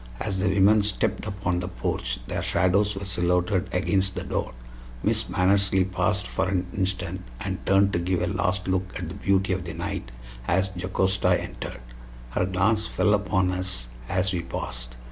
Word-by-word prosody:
As 95 Hz, -, -1 dB
the 95 Hz, 0 st, +2 dB
women 100 Hz, +2 st, +5 dB
stepped 100 Hz, -1 st, -1 dB
upon 95 Hz, -2 st, -1 dB
the 90 Hz, -, -3 dB
porch 60 Hz, -9 st, -2 dB
their -, -, -2 dB
shadows 100 Hz, +3 st, +2 dB
were 100 Hz, +1 st, -5 dB
silhouetted 90 Hz, +1 st, +1 dB
against 95 Hz, +1 st, +1 dB
the -, -, -3 dB
door. -, -, -2 dB, 0.5 s
Miss -, -, +2 dB
Mannersley 95 Hz, 0 st, +3 dB
paused 100 Hz, +1 st, +1 dB
for 95 Hz, -, -1 dB
an 95 Hz, -1 st, 0 dB
instant, 95 Hz, -1 st, -1 dB, 0.2 s
and -, -, -4 dB
turned 100 Hz, 0 st, +4 dB
to 85 Hz, -, +2 dB
give 90 Hz, +1 st, 0 dB
a -, -, +3 dB
last 90 Hz, 0 st, 0 dB
look 95 Hz, 0 st, 0 dB
at 85 Hz, -2 st, -5 dB
the -, -, -6 dB
beauty 95 Hz, -1 st, +1 dB
of 95 Hz, -1 st, -2 dB
the 85 Hz, -1 st, -6 dB
night 90 Hz, -6 st, -4 dB, 0.4 s
as 95 Hz, +2 st, +2 dB
Jocasta 95 Hz, +1 st, +2 dB
entered. -, -, -6 dB, 0.5 s
Her 90 Hz, +8 st, +1 dB
glance 105 Hz, +4 st, +2 dB
fell 105 Hz, -, +2 dB
upon 95 Hz, -2 st, +2 dB
us 90 Hz, -9 st, -2 dB, 0.2 s
as 95 Hz, +1 st, +2 dB
we 90 Hz, -, 0 dB
passed. -, -, -5 dB
95 Hz, 175 wpm, -26 LUFS, 90-95 Hz, 0.5 s, women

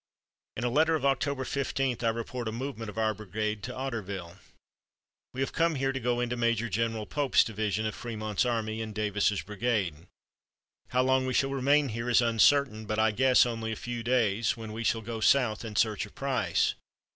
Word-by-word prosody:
In 115 Hz, -, -3 dB
a 120 Hz, -, +1 dB
letter 160 Hz, +4 st, +3 dB
of 150 Hz, -, -2 dB
October 135 Hz, 0 st, 0 dB
15, 135 Hz, -2 st, -1 dB
I 115 Hz, -, +1 dB
report 115 Hz, +1 st, -4 dB
a -, -, -1 dB
movement 115 Hz, -2 st, -5 dB
of 105 Hz, -, -10 dB
our 110 Hz, -1 st, +1 dB
brigade 105 Hz, +1 st, -3 dB
to 125 Hz, -, -5 dB
Otterville: 100 Hz, -9 st, -5 dB, 0.9 s
"We 130 Hz, -, -5 dB
have 135 Hz, -, -1 dB
come 165 Hz, -1 st, +2 dB
here 135 Hz, 0 st, 0 dB
to 135 Hz, -, -3 dB
go 120 Hz, 0 st, 0 dB
into 120 Hz, 0 st, -1 dB
Major 115 Hz, -1 st, 0 dB
General 110 Hz, +1 st, -1 dB
Pope's 145 Hz, +2 st, +3 dB
division 110 Hz, -1 st, -2 dB
of 110 Hz, -, -2 dB
Frémont's 110 Hz, -3 st, -2 dB
army 115 Hz, -2 st, -1 dB
in 110 Hz, -1 st, -5 dB
Davis's 105 Hz, -1 st, 0 dB
brigade. 105 Hz, -7 st, -2 dB, 0.8 s
How 125 Hz, 0 st, +1 dB
long 130 Hz, 0 st, +2 dB
we 130 Hz, -, -1 dB
will 135 Hz, -, -3 dB
remain 140 Hz, +1 st, +3 dB
here 115 Hz, +2 st, -3 dB
is 120 Hz, -, +5 dB
uncertain, 115 Hz, -1 st, +3 dB
but 110 Hz, -, -2 dB
I 110 Hz, 0 st, +3 dB
guess 125 Hz, +4 st, +5 dB
only 115 Hz, -2 st, -3 dB
a -, -, -2 dB
few 120 Hz, +1 st, -5 dB
days, 115 Hz, -3 st, +1 dB
when 110 Hz, -1 st, -7 dB
we 115 Hz, +1 st, -4 dB
shall 115 Hz, -1 st, +1 dB
go 115 Hz, +1 st, -5 dB
south 110 Hz, -2 st, +3 dB
in 110 Hz, -2 st, -7 dB
search 105 Hz, -1 st, +1 dB
of -, -, -20 dB
Price. 135 Hz, -1 st, +1 dB
115 Hz, 195 wpm, -29 LUFS, 110-130 Hz, 0.9 s, is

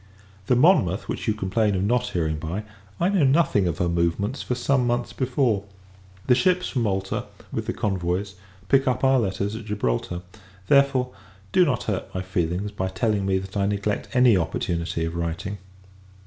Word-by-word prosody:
The 125 Hz, -, +4 dB
Monmouth, 120 Hz, -, +3 dB
which -, -, -4 dB
you 110 Hz, -, +2 dB
complain 105 Hz, +1 st, +1 dB
of 95 Hz, -, 0 dB
not 125 Hz, +4 st, +1 dB
hearing 80 Hz, -6 st, -1 dB
by, 85 Hz, +7 st, -4 dB, 0.4 s
I 175 Hz, -, +2 dB
knew 195 Hz, -6 st, +2 dB
nothing 135 Hz, -, +3 dB
of 85 Hz, -, -2 dB
her 90 Hz, -, +1 dB
movements 85 Hz, +8 st, 0 dB
for 125 Hz, -, -2 dB
some 125 Hz, 0 st, +1 dB
months 120 Hz, 0 st, -1 dB
before. 125 Hz, -5 st, +1 dB, 0.6 s
The 125 Hz, -, +5 dB
ships 180 Hz, +7 st, +2 dB
from 130 Hz, -, -1 dB
Malta, 95 Hz, -3 st, -1 dB, 0.3 s
with -, -, -3 dB
the -, -, -1 dB
convoys, 95 Hz, 0 st, -1 dB, 0.3 s
pick 135 Hz, 0 st, +3 dB
up 130 Hz, 0 st, 0 dB
our 135 Hz, 0 st, +5 dB
letters 100 Hz, 0 st, -1 dB
at 115 Hz, -1 st, -7 dB
Gibraltar. 90 Hz, -, -2 dB, 0.4 s
Therefore, 135 Hz, -2 st, +3 dB, 0.4 s
do 180 Hz, -, +5 dB
not 125 Hz, -7 st, 0 dB
hurt 100 Hz, -3 st, -4 dB
my 95 Hz, -, -2 dB
feelings, 90 Hz, +2 st, -2 dB
by 95 Hz, -2 st, -2 dB
telling 100 Hz, +2 st, 0 dB
me 95 Hz, -1 st, +2 dB
that 95 Hz, +1 st, -7 dB
I 100 Hz, -1 st, +1 dB
neglect 100 Hz, 0 st, -1 dB
any 125 Hz, -3 st, +6 dB
opportunity 85 Hz, -1 st, -1 dB
of 80 Hz, -, -4 dB
writing. 85 Hz, +4 st, -3 dB
105 Hz, 175 wpm, -24 LUFS, 95-125 Hz, 0.6 s, any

